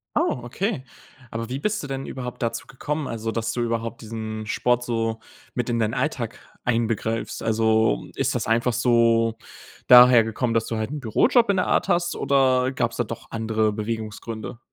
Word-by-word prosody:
Oh, 125 Hz, -, +1 dB
okay. 180 Hz, -, -2 dB, 0.5 s
Aber 115 Hz, 0 st, -4 dB
wie 130 Hz, +3 st, -4 dB
bist 210 Hz, +6 st, -1 dB
du 145 Hz, -, -6 dB
denn 135 Hz, 0 st, -4 dB
überhaupt 125 Hz, -2 st, -6 dB
dazu 115 Hz, -, -3 dB
gekommen? 150 Hz, +2 st, -4 dB
Also, 115 Hz, -1 st, -3 dB
dass 115 Hz, 0 st, -2 dB
du 120 Hz, -, -2 dB
überhaupt 115 Hz, -1 st, -2 dB
diesen 110 Hz, -1 st, -5 dB
Sport 120 Hz, +2 st, +1 dB
so 115 Hz, -2 st, -1 dB, 0.3 s
mit 125 Hz, -1 st, -2 dB
in 120 Hz, -1 st, 0 dB
deinen 110 Hz, -1 st, 0 dB
Alltag 125 Hz, -3 st, -2 dB, 0.3 s
einbegreifst. 115 Hz, -1 st, -1 dB
Also, 110 Hz, -, +2 dB
ist -, -, 0 dB
das -, -, -1 dB
einfach 115 Hz, +2 st, +1 dB
so 115 Hz, -2 st, +3 dB, 0.5 s
daher 125 Hz, -2 st, +9 dB
gekommen, 115 Hz, +2 st, -1 dB
dass 115 Hz, -1 st, +1 dB
du 115 Hz, -, -3 dB
halt 110 Hz, +1 st, -2 dB
'n 150 Hz, -, -4 dB
Bürojob 215 Hz, -, +3 dB
in 200 Hz, -, +3 dB
der 185 Hz, -, +1 dB
Art -, -, +2 dB
hast, 175 Hz, 0 st, +1 dB
oder 130 Hz, -1 st, +2 dB
gab 115 Hz, -3 st, 0 dB
es -, -, -9 dB
da 120 Hz, -, 0 dB
doch 115 Hz, +2 st, -8 dB
andere 110 Hz, -1 st, 0 dB
Bewegungsgründe? 110 Hz, +1 st, -5 dB
115 Hz, 185 wpm, -24 LUFS, 110-125 Hz, 0.5 s, daher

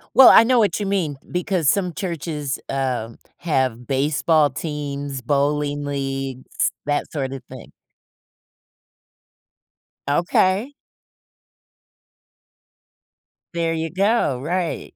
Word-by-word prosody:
Well, 265 Hz, -, +10 dB
I -, -, +8 dB
know 250 Hz, 0 st, +4 dB
what 210 Hz, -1 st, +2 dB
you 205 Hz, -, -2 dB
mean 180 Hz, -8 st, -1 dB
because 180 Hz, -4 st, 0 dB
some 180 Hz, -1 st, +1 dB
churches, 150 Hz, -5 st, -4 dB
um, 125 Hz, -4 st, -2 dB, 0.2 s
have 130 Hz, -7 st, -1 dB
baseball 145 Hz, +3 st, +2 dB
teams, 145 Hz, -3 st, -5 dB
bowling 145 Hz, +2 st, 0 dB
leagues, 135 Hz, -2 st, -2 dB
that 145 Hz, 0 st, -1 dB
sorta 135 Hz, -3 st, -4 dB
thing. -, -, -11 dB, 2.4 s
Okay. 185 Hz, +7 st, +2 dB, 2.8 s
There 165 Hz, -1 st, 0 dB
ya 160 Hz, 0 st, -2 dB
go. 195 Hz, -, +2 dB
Right. 170 Hz, +3 st, -3 dB
150 Hz, 90 wpm, -21 LUFS, 135-175 Hz, 2.8 s, Well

